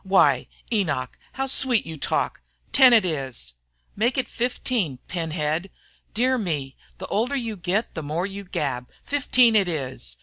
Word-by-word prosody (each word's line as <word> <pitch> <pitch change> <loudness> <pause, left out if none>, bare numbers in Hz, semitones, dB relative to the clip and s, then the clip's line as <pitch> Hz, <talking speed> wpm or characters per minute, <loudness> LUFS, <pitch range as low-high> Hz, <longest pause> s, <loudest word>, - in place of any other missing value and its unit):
"Why, 190 -1 +4 0.3
Enoch, 145 - 0 0.2
how 270 - -1
sweet 260 -3 +3
you 160 - -6
talk! 140 - -1 0.3
Ten 260 -1 +8
it 225 -5 +6
is!" 135 - -3 0.4
"Make 235 +5 +1
it 260 - 0
fifteen, 235 - -1
pin 165 -3 -3
head!" 155 +3 -1 0.5
"Dear 255 +3 +2
me, 145 - -3 0.2
the - - -6
older 240 +6 0
you 230 -5 -2
get 190 +4 -1
the 160 - -4
more 155 +4 -2
you 200 0 -6
gab! 140 -9 -3
Fifteen 255 -5 +3
it 200 -3 +4
is!" 130 - -3
185 Hz, 160 wpm, -24 LUFS, 150-235 Hz, 0.5 s, Ten